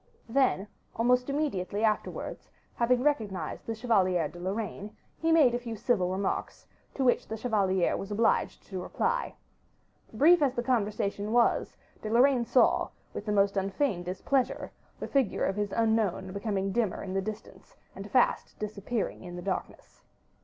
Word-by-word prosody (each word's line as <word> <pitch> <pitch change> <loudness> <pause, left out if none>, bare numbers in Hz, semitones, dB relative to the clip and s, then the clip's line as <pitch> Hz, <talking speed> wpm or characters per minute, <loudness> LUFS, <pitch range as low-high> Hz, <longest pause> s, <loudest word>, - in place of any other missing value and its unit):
Then, 235 -5 +2 0.3
almost 250 +3 +2
immediately 220 -9 -1
afterwards, 215 -1 -2 0.2
having 245 +1 +2
recognized 220 -10 -1
the 225 - -2
Chevalier 190 -8 +2
de 175 - -12
Lorraine, 205 +2 -4 0.2
he 325 0 +1
made 300 -7 +5
a 240 - 0
few 235 -2 -6
civil 200 -4 +1
remarks, 190 +1 -3 0.3
to 270 - -1
which 245 -2 +2
the 220 - -4
chevalier 195 -6 +1
was 195 - -5
obliged 220 +2 +1
to 190 -2 -6
reply. - - -1 0.8
Brief 310 +9 +5
as 270 -3 +2
the 240 - -1
conversation 210 -4 -1
was, 240 0 +2 0.2
De 215 - -4
Lorraine 245 +1 +4
saw, 250 - +3 0.2
with 210 - -6
the - - +1
most 200 -1 +3
unfeigned 195 0 -1
displeasure, 245 +8 -1 0.3
the - - -4
figure 270 -7 +1
of 195 - -1
his 205 -1 -2
unknown 220 -5 0
becoming 200 -1 -2
dimmer 220 -3 -1
in 190 -2 -5
the 195 - +1
distance, 215 +2 -8 0.2
and - - -8
fast - - +1
disappearing 210 +1 -3
in 175 -1 -8
the 175 - -6
darkness. 195 -1 -5
215 Hz, 155 wpm, -29 LUFS, 195-245 Hz, 0.8 s, made